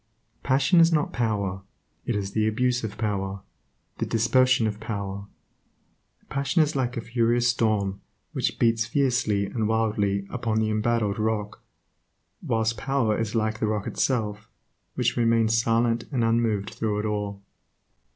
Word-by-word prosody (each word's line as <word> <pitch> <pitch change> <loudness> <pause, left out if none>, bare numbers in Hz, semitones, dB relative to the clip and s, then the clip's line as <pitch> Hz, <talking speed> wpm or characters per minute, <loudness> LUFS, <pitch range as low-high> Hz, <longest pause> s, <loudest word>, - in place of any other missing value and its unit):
Passion 140 +6 +3
is 165 0 +6
not 150 -3 +1
power; 100 -5 -1 0.5
it 120 - 0
is 100 -1 -2
the 110 +1 +1
abuse 125 +3 +1
of 110 -1 -5
power, 100 -3 -2 0.6
the - - 0
dispersion 125 +1 +3
of 105 -1 -2
power. 100 -3 -5 1.0
Passion 140 +4 +1
is 150 -1 -3
like 125 -2 -1
a - - -2
furious 120 +1 +1
storm 105 -5 0 0.3
which - - -1
beats 115 -1 +2
fiercely 125 -7 +1
and 110 +1 -2
wildly 105 -3 0
upon 115 -3 -1
the 110 0 +1
embattled 110 -1 0
rock 105 -2 -2 0.8
whilst 110 0 0
power 135 -6 +1
is 115 0 -2
like 110 -1 0
the 110 - 0
rock 105 -1 -1
itself, 105 -5 -1 0.5
which - - +1
remains 115 -1 +3
silent 115 0 +1
and 125 -4 0
unmoved 115 -3 +1
through 105 -2 -2
it 105 - -2
all. 105 -2 -3
110 Hz, 145 wpm, -25 LUFS, 105-120 Hz, 1.0 s, is